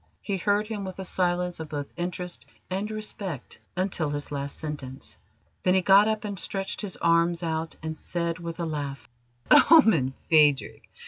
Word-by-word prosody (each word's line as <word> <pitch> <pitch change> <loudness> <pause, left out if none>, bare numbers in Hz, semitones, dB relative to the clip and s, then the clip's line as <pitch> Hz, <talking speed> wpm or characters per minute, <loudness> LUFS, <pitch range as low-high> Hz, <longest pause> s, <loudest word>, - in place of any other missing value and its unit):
He 200 -2 -1
heard 205 +3 +1
him 210 -2 -5
with 190 -1 -6
a 190 - -5
silence 180 -1 0
of 160 -1 -6
both 145 -2 -5
interest 180 0 -4 0.2
and 195 +3 -2
respect 205 - -6 0.2
until 180 -4 0
his 145 0 -4
last 140 0 -4
sentence. 145 -4 -6 0.5
Then 185 0 +3
he 190 - +4
got 195 +3 +6
up 220 0 -1
and 200 -3 -1
stretched 195 -1 -3
his 200 -4 -5
arms 170 +1 +2
out 160 0 -2
and 160 0 -3
said 170 -1 -3
with 170 0 -6
a 170 - -1
laugh: 145 -3 -4 0.6
"Omen, 190 - +6
Phadrig! 150 -4 +3
175 Hz, 170 wpm, -26 LUFS, 155-195 Hz, 0.6 s, got